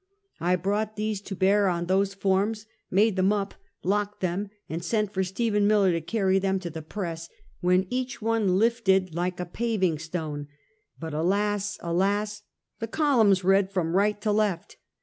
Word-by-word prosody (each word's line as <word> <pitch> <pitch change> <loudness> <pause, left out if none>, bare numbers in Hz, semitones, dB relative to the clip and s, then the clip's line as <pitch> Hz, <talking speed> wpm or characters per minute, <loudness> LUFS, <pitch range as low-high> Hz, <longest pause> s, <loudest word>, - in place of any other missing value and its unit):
I 175 +3 +2
brought 205 +4 -1
these 215 -1 -2
to 200 -1 -6
bear 200 +2 +3
on 175 -1 0
those 195 +2 +1
forms, 200 +3 0 0.2
made 205 +2 +3
them 190 +1 +3
up, 200 -1 -1 0.3
locked 205 +2 -1
them, 185 +3 -1 0.2
and 165 +2 -4
sent 215 +2 0
for 190 - +1
Stephen 205 +2 +1
Miller 205 -3 +4
to 165 -1 -1
carry 195 +1 +1
them 195 0 0
to 170 -2 -5
the 160 0 -6
press, 165 -1 -5 0.3
when 180 +1 +3
each 255 0 -2
one 220 -4 +1
lifted 195 -5 +2
like 175 +2 -2
a 180 - -2
paving 190 -5 0
stone; 155 -3 -4 0.5
but 160 -2 -6
alas, 205 +5 0
alas, 200 +5 0 0.4
the 225 - -3
columns 225 - +3
read 195 +1 +3
from 180 -3 -1
right 205 +2 +2
to 210 - +1
left. 205 -5 -1
195 Hz, 170 wpm, -26 LUFS, 180-210 Hz, 0.5 s, Miller